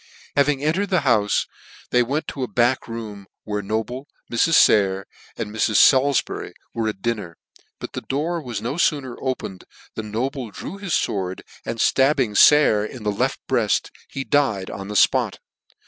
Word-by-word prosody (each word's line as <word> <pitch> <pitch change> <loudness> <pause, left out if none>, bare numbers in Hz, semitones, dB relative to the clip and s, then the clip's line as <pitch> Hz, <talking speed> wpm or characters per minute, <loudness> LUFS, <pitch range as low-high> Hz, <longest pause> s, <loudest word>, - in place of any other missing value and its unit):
Having 140 0 +2
entered 185 +7 0
the 185 -4 +2
houfe, 110 -7 +2 0.5
they 125 - +4
went 140 +6 -1
to 135 - -6
a 125 - -1
back 120 +2 +1
room, 110 -4 -7 0.2
where 105 -1 -3
Noble, 110 +7 -3 0.2
Mrs. 150 +7 +5
bayer, 95 -2 +2 0.3
and 105 - -4
Mrs. 110 0 0
Salif 135 +3 +5
bury - - -7 0.2
where 115 -2 -1
at 95 -3 -8
dinner; 105 -8 -3 0.4
but - - -8
the - - -4
door 160 +5 -2
was 120 -7 -5
no 125 +7 -3
fooner 140 -7 0
opened 130 -8 -4 0.3
than 110 -1 -6
Noble 125 +3 -3
drew 170 - -8
his 195 -5 -4
fword, 95 -6 -1 0.3
and 115 - -3
ftabbing 130 -3 +2
Sayer 145 -8 +6
in 110 +2 -7
the 105 - 0
left 100 - -1
breaft, - - +1 0.2
he 135 - -4
died 135 -10 +1
on 95 - -7
the 105 - -6
fpot. - - +3
120 Hz, 170 wpm, -22 LUFS, 105-140 Hz, 0.5 s, Sayer